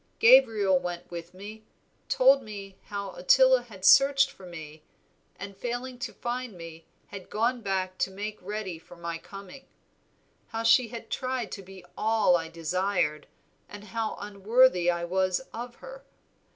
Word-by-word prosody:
Gabriel 220 - +5
went 175 0 -6
with 170 0 -7
me, 205 +4 -10 0.5
told 270 +2 +5
me 200 -4 -9
how 200 -1 -5
Ottila 260 +7 +4
had 195 -5 -9
searched 275 +2 +6
for 190 -8 -14
me, 155 -3 -10 0.6
and 200 0 -8
failing 245 +4 -5
to - - -4
find 245 -1 -4
me 165 -1 -11 0.2
had 195 -3 -10
gone 235 +3 0
back 190 -2 -2
to - - +1
make 210 +3 -6
ready 190 -3 -5
for 170 - -15
my 170 -1 -5
coming. 200 +9 -12 0.8
How 225 0 -4
she 230 +2 +5
had 230 0 -9
tried 255 -4 -3
to 195 - -6
be 190 -1 -13
all 220 -4 +3
I 165 -1 -1
desired, 170 -1 -1 0.4
and 205 0 -10
how 220 +2 -3
unworthy 205 -1 +3
I 170 -1 0
was 185 +1 0
of 240 +1 -7
her. - - -11
200 Hz, 150 wpm, -27 LUFS, 180-240 Hz, 0.8 s, searched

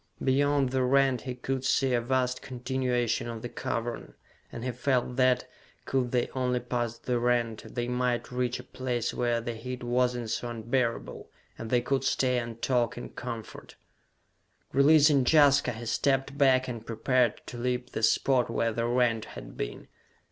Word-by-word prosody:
Beyond 140 0 +2
the 130 0 +1
rent 135 0 +3
he 130 -2 -5
could 130 +1 -3
see 135 -1 +2
a 120 - +2
vast 125 +1 0
continuation 125 -2 -1
of 115 -1 -6
the 120 - -4
cavern, 115 +1 -4 0.4
and 120 - -7
he 125 - -1
felt 125 0 0
that, 130 -1 +3 0.4
could 130 -2 0
they 125 -1 +1
only 125 -1 0
pass 120 -1 -3
the 125 0 -1
rent, 120 -2 -1
they 120 -1 -1
might 125 0 -1
reach 125 -1 -1
a - - -8
place 125 -2 -3
where 120 -1 0
the 120 0 -4
heat 125 +2 -6
was 125 +1 +1
not 120 -2 -4
so 120 +1 -2
unbearable, 120 +1 -2 0.3
and 115 - -7
they 125 0 +3
could 135 +2 0
stay 130 -2 +1
and 115 -1 -7
talk 120 -3 +1
in 120 - -6
comfort. 115 -3 -8 1.0
Releasing 145 0 +5
Jaska, 140 -2 +5
he 115 +1 -8
stepped 135 +3 0
back 130 -2 +4
and 120 -3 -5
prepared 115 +1 +1
to 120 - -8
leap 125 +1 -2
the - - -3
spot 125 +2 +3
where 115 0 0
the 115 +1 -1
rent 120 -2 +1
had - - -10
been. - - -5
125 Hz, 170 wpm, -28 LUFS, 120-130 Hz, 1.0 s, Releasing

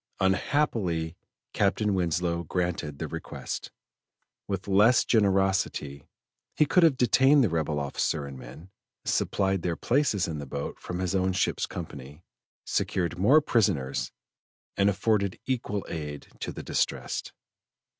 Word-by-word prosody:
Unhappily 95 - 0 0.4
Captain 105 +1 +1
Winslow 85 -1 0
granted 85 -4 -2
the - - -4
request. - - -6 0.8
With 95 -1 -3
less 105 +5 +5
generosity, 95 - +1 0.5
he 155 - +4
could 180 +5 +3
have 160 -6 +5
detained 135 +4 +5
the 110 - +2
rebel 80 -3 -1
officer 70 +1 -1
and 70 -1 -8
men, 65 +9 -11 0.3
supplied 95 -2 +1
their 85 0 -1
places 120 - +1
in 80 -3 -4
the 70 - -7
boat 70 +2 -5
from 90 - -5
his 95 0 -1
own 95 -1 +1
ship's 95 - 0
company, 70 +5 -8 0.4
secured 90 -1 -1
more 135 +11 +6
prisoners, 95 - 0 0.6
and 100 +1 +3
afforded 100 -1 +1
equal 115 -6 -2
aid 75 -3 -6
to - - -4
the - - -8
distressed. - - -2
95 Hz, 130 wpm, -27 LUFS, 80-105 Hz, 0.8 s, more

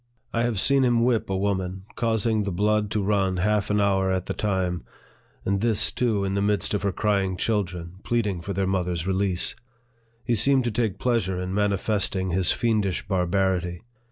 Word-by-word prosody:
I 115 - +1
have 120 -4 0
seen 140 +4 +4
him 120 -2 +3
whip 120 -4 +1
a 95 - 0
woman, 95 -1 -2
causing 110 -1 +1
the 100 -1 -2
blood 105 +3 +1
to 105 -1 -1
run 95 -2 +1
half 105 +2 +1
an 105 0 +2
hour 95 -1 +2
at 95 -1 -1
the - - -3
time; 95 - -1 0.6
and 100 0 0
this, 115 -2 +3
too, 110 -5 0
in 95 - -2
the 100 - 0
midst 105 0 0
of 105 - 0
her 100 - 0
crying 95 -2 0
children, 90 -5 -2
pleading 105 -7 -1
for 100 - -5
their 95 0 0
mother's 90 -3 -1
release. 95 -1 +1 0.7
He 120 - 0
seemed 130 +4 +3
to 120 - -1
take 105 -3 -1
pleasure 105 -7 0
in 90 +1 -4
manifesting 100 -2 0
his 90 +1 +2
fiendish 105 -6 0
barbarity. 90 -2 0
100 Hz, 185 wpm, -25 LUFS, 95-105 Hz, 0.7 s, seen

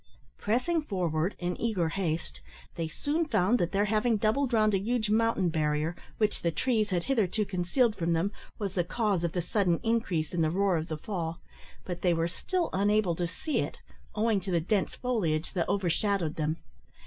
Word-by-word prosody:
Pressing 255 +11 +1
forward 180 - -1
in 175 0 -2
eager 195 -8 +1
haste, 160 - -3 0.3
they 165 - -3
soon 290 - -1
found 220 -2 +3
that 175 - 0
their 200 +1 +2
having 220 +2 +2
doubled 235 +6 +1
round 215 -2 +3
a 195 - +3
huge 220 +1 0
mountain 220 -5 +2
barrier, 155 +1 0 0.2
which 215 -1 +1
the 170 - +1
trees 215 +5 +1
had 175 -3 0
hitherto 215 -4 +1
concealed 200 +5 +1
from 170 -3 0
them, 170 +5 +1 0.3
was 200 -4 -3
the 180 - +1
cause 200 -2 0
of 170 - -1
the 175 - -1
sudden 180 -3 +1
increase 200 -10 0
in 175 - +1
the 160 - +3
roar 195 +2 +2
of 160 0 -2
the 155 - -3
fall, 170 -2 -4 0.5
but 180 -1 -5
they 175 -2 +3
were 165 0 +1
still 345 - -2
unable 205 -1 +2
to 175 +1 -1
see 295 - -2
it, - - -3 0.4
owing 215 -2 +2
to 190 - -6
the 175 -2 +2
dense 195 +4 0
foliage 180 -11 -1
that 175 -4 -1
overshadowed 190 -2 +1
them. 155 +1 -1
190 Hz, 190 wpm, -29 LUFS, 170-220 Hz, 0.5 s, found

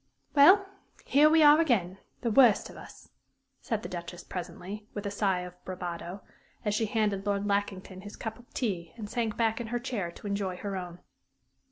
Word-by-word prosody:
"Well, 370 +8 +7 0.4
here 295 +3 +5
we 320 0 +5
are 295 +2 +8
again 195 - +1 0.2
the 235 - 0
worst 240 -3 +5
of - - -14
us!" - - -13 0.5
said 225 -1 -2
the - - -4
Duchess, 175 0 -7
presently, 190 +3 -7
with 205 - -4
a 200 - -2
sigh 195 -3 +1
of 180 0 -10
bravado, 180 0 -6 0.4
as 210 - +1
she 220 +1 +1
handed 205 -2 0
Lord 200 0 0
Lackington 200 -2 -2
his 205 +1 -9
cup 220 0 -6
of 245 - -19
tea 180 -9 -3
and 215 -3 -6
sank 230 -1 -2
back 225 0 +1
in 235 - -5
her 240 +2 -1
chair 235 -8 -3
to - - -14
enjoy 200 -2 -2
her 200 +1 -4
own. 180 -1 -6
205 Hz, 190 wpm, -29 LUFS, 185-235 Hz, 0.5 s, are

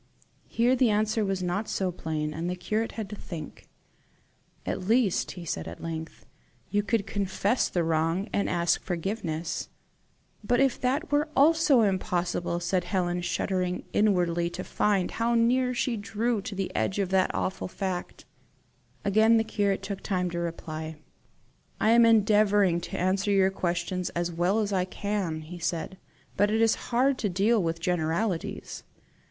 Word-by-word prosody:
Here 240 +3 +2
the 250 -2 +3
answer 215 +1 +1
was 195 -2 -1
not 180 +5 -2
so 190 -2 -1
plain, 155 -3 -3
and 165 +3 -3
the 180 - -2
curate 215 +5 -2
had 220 -3 -4
to - - -4
think. 170 -5 -9 1.0
"At 185 - -3
least," 225 -4 +2
he 175 -2 -9
said 80 - -3
at 85 - -8
length, 160 -1 -6 0.5
"you 205 - +2
could 210 -1 0
confess 200 +3 0
the 175 - 0
wrong, 165 +4 0
and 200 - +1
ask 170 -1 +1
forgiveness." 170 -3 -3 0.7
"But 245 +4 +2
if 270 -2 +2
that 265 +5 +1 0.3
also 310 0 +5
were 225 -3 +5
impossible," 175 -2 -1
said 175 +1 0
Helen, 180 -1 -1
shuddering 180 0 -1
inwardly 175 -5 +2
to 175 +2 -6
find 200 -4 +1
how 235 +1 0
near 250 +2 +3
she 245 -1 -1
drew 215 +2 -1
to 200 0 -6
the 195 0 -3
edge 190 - 0
of 195 -3 0
the 190 -1 +2
awful 185 - -2
fact. 185 -1 -5 0.8
Again 220 +3 +5
the 225 - +3
curate 200 -3 -1
took 195 0 -5
time 180 -3 -1
to 170 - -3
reply. 160 -2 -5 0.8
"I 220 - +3
am 235 0 +6
endeavouring 205 -4 +4
to - - -6
answer 190 +3 +1
your 195 -1 +4
questions 180 0 -2
as 175 0 -1
well 180 +6 +1
as 205 -1 -2
I 185 -1 +2
can," 185 -4 -3
he 175 +3 -9
said; 170 +2 -3 0.4
"but 205 +1 +3
it 220 +1 +1
is 225 -1 +1
hard 260 +2 +2
to 210 - 0
deal 205 +5 +2
with 165 -1 -2
generalities. 170 +2 -2
190 Hz, 160 wpm, -27 LUFS, 175-215 Hz, 1.0 s, am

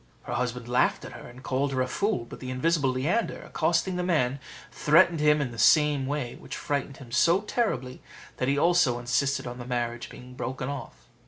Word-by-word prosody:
Her - - -5
husband 120 -1 -2
laughed 125 +1 +1
at - - -8
her, - - -10
and 125 +2 -13
called 135 +2 -1
her 130 - +1
a - - -3
fool. 200 - -1
But - - -11
the 130 - -7
invisible 140 +2 +1
Leander 150 - -1
accosting 170 +3 0
the 180 - -1
man, 140 -7 +1 0.3
threatened 165 +2 +4
him 150 0 +4
in 140 -4 -2
the 115 - -9
same 150 -3 +4
way, 140 -4 -3
which - - -7
frightened 140 -2 -3
him 125 -4 -12
so 170 +9 +4
terribly, 135 - -2 0.4
that 130 - -1
he 140 +1 +2
also 170 -6 +3
insisted 125 +3 0
on 125 0 -6
the - - -5
marriage 120 -1 -3
being 125 0 -12
broken 130 +1 -4
off. 115 - -8
135 Hz, 200 wpm, -27 LUFS, 125-155 Hz, 0.4 s, threatened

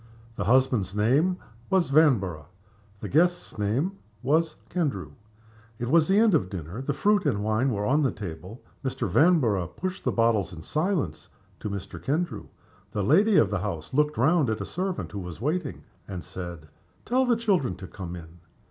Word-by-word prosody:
The - - -3
husband's 120 -6 +2
name 140 - +2 0.3
was 185 -7 +2
Vanborough. 100 - +3 0.5
The - - -4
guest's 175 -4 +1
name 135 - -1 0.2
was 155 +4 +2
Kendrew. 135 - -2 0.7
It 120 +1 -3
was 160 -1 +5
the 195 - +3
end 220 -2 +5
of 140 - +2
the 95 - -4
dinner. 85 - -7
The 140 +1 -2
fruit 205 +7 +3
and 135 - +2
the - - -3
wine 110 +5 +1
were 105 -4 -1
on 145 +7 +3
the 135 - +2
table. 95 +2 -8 0.2
Mr. 130 -3 -2
Vanborough 115 - +3
pushed 185 - -5
the - - +1
bottles 115 -6 +1
in 80 -1 -9
silence 160 - -1 0.3
to 105 - -4
Mr. 100 -2 -6
Kendrew. 145 -6 -2 0.4
The 105 - -1
lady 195 - +4
of 100 -4 +4
the 100 - 0
house 90 -3 -5
looked 150 +2 +2
round 150 +2 +3
at 110 - 0
the 100 - -5
servant 185 - -3
who 100 - -5
was 90 -3 -7
waiting, 150 +2 -2 0.2
and 90 -4 -6
said, 85 -2 -8 0.4
"Tell 255 +3 +2
the 245 -2 +3
children 190 - +1
to 95 0 -9
come 90 -2 -7
in." 85 0 -11
125 Hz, 185 wpm, -26 LUFS, 100-165 Hz, 0.7 s, was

